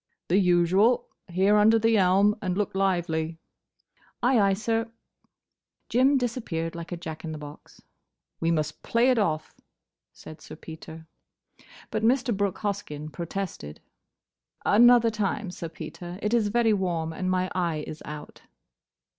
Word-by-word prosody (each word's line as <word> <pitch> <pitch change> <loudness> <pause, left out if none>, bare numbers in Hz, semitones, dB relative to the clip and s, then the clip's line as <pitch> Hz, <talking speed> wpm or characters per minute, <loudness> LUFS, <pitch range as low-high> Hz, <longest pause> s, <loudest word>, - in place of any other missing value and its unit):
"The 185 +4 +4
usual. 185 +5 +3 0.2
Here, 190 +3 +3
under 220 +2 +5
the 225 0 +3
elm. 195 +2 +4
And 185 -2 -2
look 210 - -1
lively." 170 -4 0 0.9
"Ay, 245 -1 +4
ay, 200 -1 +4
sir!" 225 +3 -1 1.0
Jim 265 +4 +4
disappeared 220 -10 -3
like 170 0 -8
a 175 - -3
Jack 160 -2 -7
in 160 -1 -5
the - - -6
box. 150 0 -12 0.6
"We 165 - 0
must 155 -2 -1
play 240 +3 +2
it 250 - +2
off," 160 -6 -1 0.6
said 155 0 -12
Sir - - -10
Peter. 160 0 -10 0.9
But 215 - -1
Mr. 240 0 +2
Brooke 200 -2 -1
Hoskyn 175 -8 -4
protested. 170 - -5 0.9
"Another 235 +1 +6
time, 210 -2 -2
Sir 170 -2 -6
Peter. 175 +2 -8
It 210 +2 0
is 230 -3 +3
very 225 +1 +2
warm, 170 -5 -1
and 185 +3 -3
my 185 0 0
eye 170 -4 -1
is 155 - -8
out." 150 0 -9
185 Hz, 145 wpm, -26 LUFS, 165-220 Hz, 1.0 s, Another